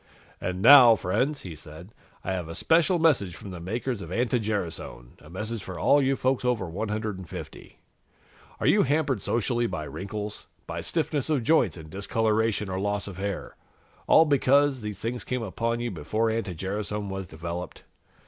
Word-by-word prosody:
"And 90 +1 -3
now, 130 -5 +10
friends," 125 +10 -1
he 90 - -7
said, 80 +5 -12 0.3
"I 95 - -2
have 90 -3 -4
a 85 - -6
special 170 +2 +3
message 130 - +2
from 95 +5 -9
the 90 - -7
makers 115 +5 -3
of 85 - -8
anti 120 +3 +1
gerasone, 85 - -4
a 75 - -15
message 110 +5 -4
for 95 -2 -7
all 145 - +4
you 135 0 +2
folks 130 0 0
over 125 -4 0
150. 105 0 -5 0.8
Are - - -2
you - - +5
hampered 140 -5 +1
socially 120 +1 0
by 90 -6 -4
wrinkles, 105 +6 -6 0.2
by - - -5
stiffness 145 -1 -2
of 145 -6 +1
joints 120 - +3
and 80 -1 -11
discoloration 110 +2 0
or 95 0 -3
loss 100 0 -1
of 95 -3 -8
hair, 100 -1 -4 0.5
all 160 - +7
because 140 -2 +3
these 105 -2 -5
things 115 +3 -4
came 125 -2 -3
upon 115 +3 -2
you 120 0 -2
before 105 +7 -1
anti 110 -5 -3
gerasone 100 +3 -3
was 95 -1 -5
developed? 85 +2 -6
105 Hz, 170 wpm, -26 LUFS, 95-125 Hz, 0.8 s, now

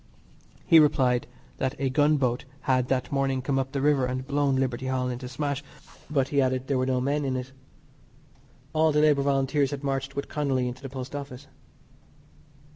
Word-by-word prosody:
He 165 -3 +7
replied 130 -5 +3 0.3
that 130 +1 -1
a 135 -1 -1
gunboat 140 -4 +2 0.2
had 130 -1 +1
that 130 -1 -1
morning 135 -2 0
come 135 0 0
up 135 0 -2
the 140 -1 -2
river 140 -3 +3
and 130 0 -2
had 130 - -13
blown 140 -1 +1
Liberty 130 -1 -1
Hall 130 -1 -1
into 125 0 -5
smash, 140 0 -3 0.5
but, 140 -3 +1
he 140 -1 +2
added, 130 0 0
there 135 -1 0
were 130 - 0
no 130 -1 +1
men 140 +3 0
in 135 -2 -1
it. 130 +1 -5 1.2
All 155 0 +3
the 150 0 +3
Labour 150 -2 +4
Volunteers 135 0 +1
had 145 -1 -5
marched 135 -1 -2
with 140 - -3
Connolly 135 -4 0
into 125 +2 -6
the 135 - -7
Post 130 +1 -7
Office. 140 -1 -7
135 Hz, 190 wpm, -26 LUFS, 130-140 Hz, 1.2 s, He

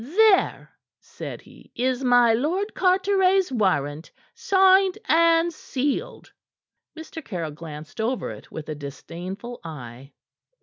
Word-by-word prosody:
"There," 390 - +3 0.3
said - - -9
he, - - -18
"is 255 +1 -1
my 245 -2 +5
Lord 345 - -1
Carteret's 380 -1 +2
warrant, 160 - 0 0.2
signed 385 -4 +4
and 335 +1 +4
sealed." 295 - -3 0.6
Mr. 320 0 -8
Caryll 170 - -4
glanced 155 +4 -8
over 245 +3 -2
it - - -12
with 160 -1 -7
a 155 - -3
disdainful 175 - -8
eye. 135 -4 -9
255 Hz, 115 wpm, -24 LUFS, -, 0.6 s, my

